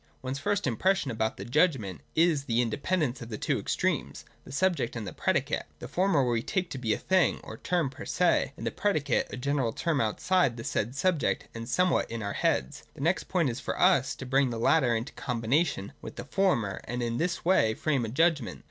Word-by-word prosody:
One's 130 +1 -3
first 205 +5 0
impression 145 - +1
about 110 -1 -1
the - - -6
Judgment 125 - +1
is 160 -4 +3
the 115 -2 +1
in 120 -2 +1
dependence 145 -1 -1
of 115 - -7
the 110 - -4
two - - 0
extremes, - - -2 0.2
the - - -11
subject 165 -5 0
and 115 -3 -4
the 95 - -6
predicate. - - 0
The - - -8
former 180 -7 +2
we 120 -2 +1
take 185 - -2
to 135 - -4
be 115 -3 -1
a - - +2
thing 185 -2 +2
or - - -8
term 170 -7 0
per 140 +4 -9
se, 175 -5 +1
and 115 - -6
the 115 - 0
predicate 175 - 0
a - - -5
general 135 -2 0
term 155 +4 0
outside 125 - +1
the 115 - -6
said 115 +4 -2
subject 165 -1 0
and 115 +1 -7
somewhere 180 +2 +2
in 115 -1 -4
our 100 - -3
heads. 65 - 0
The - - -9
next 170 +5 +1
point 170 -8 +1
is 115 - -6
for - - -4
us 135 -1 +4
to 130 - -8
bring 135 +1 +2
the 115 - -4
latter 120 0 +3
into 115 +4 -4
combination 120 - -1
with - - -8
the - - -7
former, 120 - 0
and 120 +1 -3
in 115 0 -1
this 175 +1 -1
way 110 -12 +3
frame 140 -3 0
a 115 - -3
Judgment. 145 - +1
135 Hz, 220 wpm, -28 LUFS, 115-170 Hz, 0.2 s, us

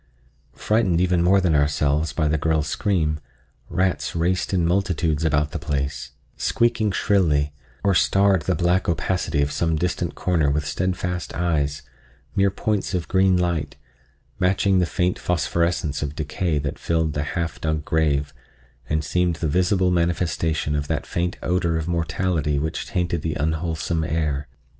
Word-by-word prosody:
Frightened 105 -6 +1
even 90 -1 +2
more 95 +3 +4
than 90 -4 +2
ourselves 75 +1 +1
by 80 -2 0
the 75 - +1
girl's 80 0 +1
scream, 80 -4 0 0.5
rats 95 +1 0
raced 85 +2 0
in 90 -3 +2
multitudes 85 -4 +1
about 75 -1 +1
the - - -4
place, 70 -2 -3 0.2
squeaking 115 -3 +1
shrilly, 75 -8 +2 0.3
or 100 - +3
starred 95 0 +3
the 90 +4 0
black 90 +1 +1
opacity 80 -2 0
of 70 - -2
some 80 +2 0
distant 85 0 -2
corner 85 -6 +1
with 75 +1 0
steadfast 90 +3 -2
eyes, 75 -5 0 0.5
mere 100 0 +4
points 100 0 -1
of 90 - -2
green 95 -1 +3
light, 85 -5 -1 0.6
matching 95 +1 +3
the 90 - +2
faint 90 0 0
phosphorescence 85 -2 0
of 75 0 -3
decay 80 +2 -1
that 70 -1 -3
filled 80 -2 0
the 75 - -1 0.2
half 85 -1 -3
dug 80 -1 -1
grave 75 -3 +1 0.6
and 75 0 0
seemed 90 +2 +1
the 80 0 -2
visible 90 +3 +2
manifestation 85 -3 0
of 75 0 -2
that - - -2
faint 85 +1 -2
odor 85 -2 +1
of 80 0 -3
mortality 85 -3 0
which 80 +3 -2
tainted 85 -2 -1
the 80 -1 -2
unwholesome 80 +1 -1
air. 75 -3 -1
85 Hz, 150 wpm, -23 LUFS, 75-90 Hz, 0.6 s, more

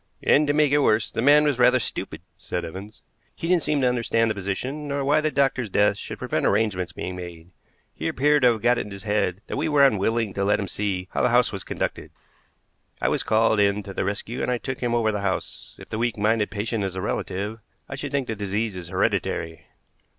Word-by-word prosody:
"And, 150 +1 +4
to 145 - +2
make 150 -1 +3
it 145 - +4
worse, 110 -5 +2
the - - -2
man 145 +4 +6
was 145 -4 +1
rather 125 +1 +6
stupid," 105 -7 -5
said 90 -2 -4
Evans. 95 +6 -9 0.3
"He 165 - -5
didn't 180 -1 +3
seem 150 -2 0
to 130 - +3
understand 115 -2 +1
the - - 0
position, 115 +10 -4
nor 140 -1 -2
why 150 +2 +3
the 155 - +1
doctor's 135 -5 +1
death 105 +1 +3
should - - -7
prevent - - -2
arrangements 100 -3 0
being 90 - -5
made. 85 -1 -9 0.4
He 80 - -4
appeared 145 - +2
to 125 -2 +5
have 110 - -8
got 120 0 +3
it - - -4
into 100 - -8
his 95 - -11
head 100 -3 0
that - - -5
we 155 +3 0
were 145 -2 +5
unwilling 110 -2 +1
to 100 - -1
let 105 +2 +2
him 100 - -3
see 95 -1 -3
how - - -1
the - - +3
house 120 0 +3
was 95 -2 -5
conducted. - - -4 0.9
I - - +1
was - - 0
called 110 -1 +2
in 100 0 +2
to 100 - -8
the - - -1
rescue, 105 +5 -3
and - - -1
I 125 - +1
took 130 +2 -5
him 120 -1 0
over 110 -2 +2
the 105 -1 -3
house. 95 -2 -4
If - - -13
the 110 - -4
weak 120 -1 0
minded 105 0 +1
patient 105 0 -2
is 95 -1 -3
a 95 - -3
relative, 100 +2 -3 0.3
I - - -7
should 140 0 -5
think 140 -2 0
the 110 - -3
disease 105 +1 -2
is 90 -2 -7
hereditary." 85 -2 -1
110 Hz, 240 wpm, -24 LUFS, 100-130 Hz, 0.9 s, man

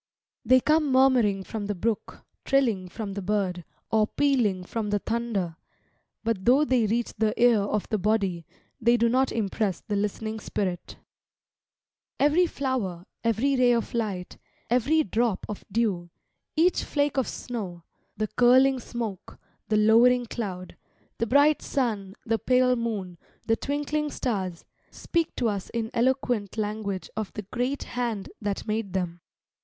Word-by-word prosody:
They 255 +2 +6
come 305 +1 +2
murmuring 250 -7 +4
from 205 +1 -5
the 205 - -2
brook, 220 +4 -3 0.2
trilling 230 -10 +1
from 205 +1 -5
the 200 - -4
bird, 190 -3 -1 0.3
or 215 -1 +3
pealing 235 -11 +1
from 215 +3 -3
the 205 - +2
thunder; 205 -7 -2 0.7
but 225 -4 -1
though 265 +7 +5
they 250 -6 +2
reach 235 +3 -1
the 215 0 +1
ear 240 -2 +5
of 205 +1 -1
the 215 - 0
body, 195 -5 0 0.3
they 235 +1 +4
do 235 0 +3
not 255 +3 +2
impress 205 -3 -1
the 210 - -3
listening 215 +2 -2
spirit. 185 -4 -3 1.2
Every 310 +5 +4
flower, 235 - -3 0.2
every 230 +5 +2
ray 250 -1 +4
of 230 -1 -1
light, 205 -6 -3 0.3
every 280 +6 +3
drop 225 0 0
of 210 - -6
dew, 195 -6 0 0.5
each 345 +3 +3
flake 285 -1 0
of 265 - +2
snow, 190 -9 -6 0.3
the 215 - 0
curling 260 +3 +4
smoke, 230 -5 -6 0.3
the 215 - +2
lowering 235 +3 +5
cloud, 190 -6 -5 0.4
the 230 - 0
bright 285 +5 +4
sun, 215 -7 -2
the 225 0 +1
pale 250 +3 +3
moon, 205 -7 -3 0.3
the 225 - +3
twinkling 295 +3 -2
stars, 190 - -3 0.2
speak 335 -2 -2
to 245 - 0
us 200 -3 -3
in 225 -1 -3
eloquent 240 -4 0
language 210 -3 -3
of 215 -2 -3
the 210 - -5
great 250 +7 -2
Hand 235 -5 -3
that 205 -2 -3
made 215 -3 -2
them. 175 -2 -2
225 Hz, 150 wpm, -26 LUFS, 200-250 Hz, 1.2 s, They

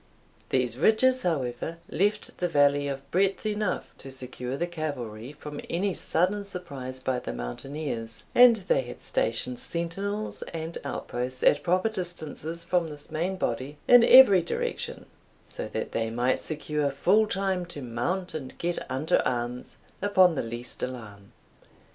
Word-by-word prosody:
These 125 -2 0
ridges, 255 - +4
however, 145 -1 -2
left 205 +5 0
the 180 - +1
valley 145 -2 +3
of 140 0 -5
breadth 195 +3 +1
enough 210 -2 -1
to 135 - -8
secure 130 0 -5
the 175 - 0
cavalry 140 -8 -5
from 150 0 -8
any 190 +3 0
sudden 185 +6 +1
surprise 140 -10 -6
by 130 -1 -1
the - - -5
mountaineers 115 - -5
and 245 -1 +8
they - - +1
had - - -10
stationed 255 - -1
sentinels 200 0 -3
and 165 +1 -4
outposts 125 -2 -3
at - - +5
proper 185 +4 +2
distances 170 -4 -4
from 175 -1 +1
this 150 -1 -7
main 175 +5 -1
body, 130 +1 -2
in 245 -1 +8
every 235 -8 +9
direction, 170 - -3 0.4
so - - -6
that - - -4
they 115 0 -1
might 120 +3 +1
secure 150 -2 -1
full 190 +10 +3
time 190 -2 -1
to 145 -5 -7
mount 150 +11 -2
and 135 -5 -6
get 175 0 -1
under 135 +5 +1
arms 120 0 -3 0.2
upon 185 -3 +5
the 150 - -1
least 120 +2 -5
alarm. 105 -6 -7
155 Hz, 150 wpm, -27 LUFS, 130-190 Hz, 0.4 s, every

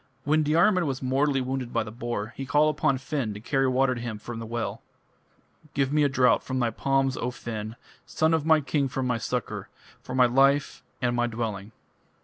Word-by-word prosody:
When 155 +2 +2
Diarmid 170 +5 +3
was 135 -2 -3
mortally 135 +1 +1
wounded 130 -1 -3
by - - 0
the 105 - -8
boar, 120 -1 -4
he 135 - -6
called 150 +2 +3
upon 145 -3 +2
Finn 130 -5 -3
to - - -7
carry 135 +4 +1
water 130 0 +2
to 120 - -6
him 115 -3 -4
from 115 +2 -7
the 115 - -6
well: 115 +1 -3 0.9
Give 140 0 +1
me 150 - +3
a 145 - +4
draught 130 -2 +3
from 130 - -4
thy 120 -2 +1
palms, 135 +2 0
O 125 - -1
Finn, 110 -3 -6 0.3
Son 160 +1 +1
of 160 -2 +2
my 160 0 +4
king 140 0 0
for 130 0 -3
my 125 -2 0
succour, 125 +1 -4 0.3
For 125 - -6
my 130 -1 +6
life 135 +3 +2 0.2
and 120 0 +1
my 120 0 +1
dwelling. 110 -3 -4
130 Hz, 205 wpm, -26 LUFS, 120-140 Hz, 0.9 s, my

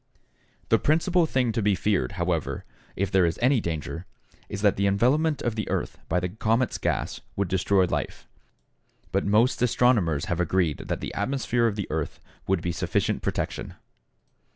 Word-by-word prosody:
The - - +4
principal 165 +2 +2
thing 125 -5 +1
to 110 - -1
be 105 -1 +3
feared, 100 0 0
however, 85 -3 -2 0.3
if 100 0 -1
there 95 -1 +4
is 85 -1 +1
any 125 0 +3
danger, 85 +1 -4 0.4
is 100 0 -5
that 100 - +4
the 100 +1 +1
envelopment 135 +10 +2
of 120 - 0
the 110 -1 -4
earth - - -2
by 90 - +2
the 90 +1 -2
comet's 115 +5 0
gas - - -2
would 100 - 0
destroy 95 +1 +2
life, - - -4 0.8
but - - 0
most 110 +5 +3
astronomers 110 - +3
have 85 - -2
agreed 90 -3 +1
that - - -2
the - - -5
atmosphere 120 +1 0
of 105 - -1
the 100 -3 -2
earth 80 -1 -3 0.3
would 95 -3 +1
be 90 - 0
sufficient 80 - -1
protection. - - -3
100 Hz, 170 wpm, -26 LUFS, 90-120 Hz, 0.8 s, The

